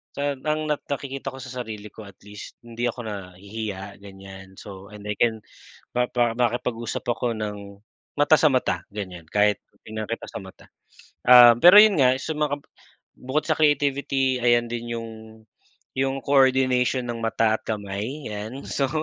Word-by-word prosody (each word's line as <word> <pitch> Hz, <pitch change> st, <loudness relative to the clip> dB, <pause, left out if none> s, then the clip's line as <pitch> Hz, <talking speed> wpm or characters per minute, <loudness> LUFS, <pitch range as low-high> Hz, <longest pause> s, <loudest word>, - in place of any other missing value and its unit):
sa 145 Hz, +1 st, -1 dB
ang 150 Hz, +3 st, -2 dB
nak 150 Hz, -, 0 dB
nakikita 140 Hz, -1 st, -5 dB
ko 135 Hz, -1 st, -5 dB
sa 130 Hz, -, -9 dB
sarili 105 Hz, -3 st, -7 dB
ko, 110 Hz, -, -11 dB
at 100 Hz, -, -14 dB
least, 105 Hz, 0 st, -11 dB
hindi 120 Hz, +1 st, -3 dB
ako 120 Hz, +1 st, -5 dB
nahihiya, 100 Hz, 0 st, -7 dB
ganyan. 95 Hz, -1 st, -12 dB
So, 95 Hz, 0 st, -11 dB
and 105 Hz, 0 st, -12 dB
I 105 Hz, -, -4 dB
can 110 Hz, -2 st, +1 dB, 0.5 s
mapa 120 Hz, -1 st, +1 dB
makipag-usap 120 Hz, -1 st, -2 dB
ako 120 Hz, 0 st, -1 dB
ng 100 Hz, -2 st, -7 dB, 0.4 s
mata 145 Hz, +2 st, +5 dB
sa 155 Hz, -, +5 dB
mata, 115 Hz, -7 st, +1 dB
ganyan, 90 Hz, -5 st, -7 dB
kahit 105 Hz, +3 st, +2 dB, 0.2 s
titingnan 110 Hz, 0 st, -6 dB
kita 115 Hz, -, -5 dB
sa -, -, -6 dB
mata. 95 Hz, -1 st, -13 dB, 0.6 s
Um, 120 Hz, -1 st, +9 dB
pero 175 Hz, +8 st, +8 dB
'yon 215 Hz, -4 st, +5 dB
nga, 130 Hz, -1 st, +5 dB
sa 160 Hz, -, -4 dB
makam 145 Hz, -1 st, -1 dB, 0.6 s
bukod 135 Hz, +4 st, -2 dB
sa -, -, +1 dB
creativity, 140 Hz, -3 st, +1 dB
ayan 120 Hz, -1 st, +3 dB
din 120 Hz, 0 st, -5 dB
'yong 115 Hz, -1 st, -6 dB, 0.9 s
'yong 135 Hz, 0 st, 0 dB
coordination 130 Hz, -2 st, +3 dB
ng 120 Hz, -1 st, -4 dB
mata 115 Hz, -1 st, +1 dB
at -, -, -36 dB
kamay 110 Hz, +6 st, -4 dB
'yan, 110 Hz, +6 st, -6 dB
so, 135 Hz, -, 0 dB
120 Hz, 160 wpm, -24 LUFS, 105-135 Hz, 0.9 s, Um